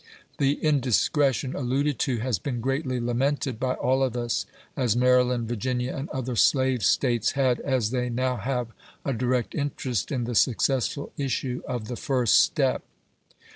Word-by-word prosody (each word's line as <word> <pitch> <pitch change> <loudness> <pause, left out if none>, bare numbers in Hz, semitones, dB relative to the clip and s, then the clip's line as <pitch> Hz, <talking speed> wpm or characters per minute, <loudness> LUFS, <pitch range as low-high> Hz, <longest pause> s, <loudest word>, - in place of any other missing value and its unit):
The 140 0 +3
indiscretion 135 -1 +2
alluded 140 +1 0
to 125 -3 0
has 120 -6 -1
been 125 +2 -3
greatly 135 +1 -1
lamented 125 +1 -1
by 130 -1 0
all 130 +2 +1
of 130 -2 0
us, 120 -2 -1 0.3
as 120 -4 +1
Maryland, 125 -1 +3
Virginia, 125 +2 -2
and 135 +4 -5
other 130 -3 -3
slave 130 -1 +3
States, 120 +1 +2
had, 130 -3 +2
as 125 -6 0
they 125 -1 -1
now 125 +1 -1
have, 125 +2 -2 0.4
a 140 - 0
direct 125 +1 -1
interest 135 - -2
in 130 -4 -1
the 120 +1 -3
successful 130 +4 +1
issue 130 -2 -2
of 120 -4 -4
the 125 - -4
first 125 -3 +3
step. - - +1
125 Hz, 155 wpm, -26 LUFS, 120-135 Hz, 0.4 s, The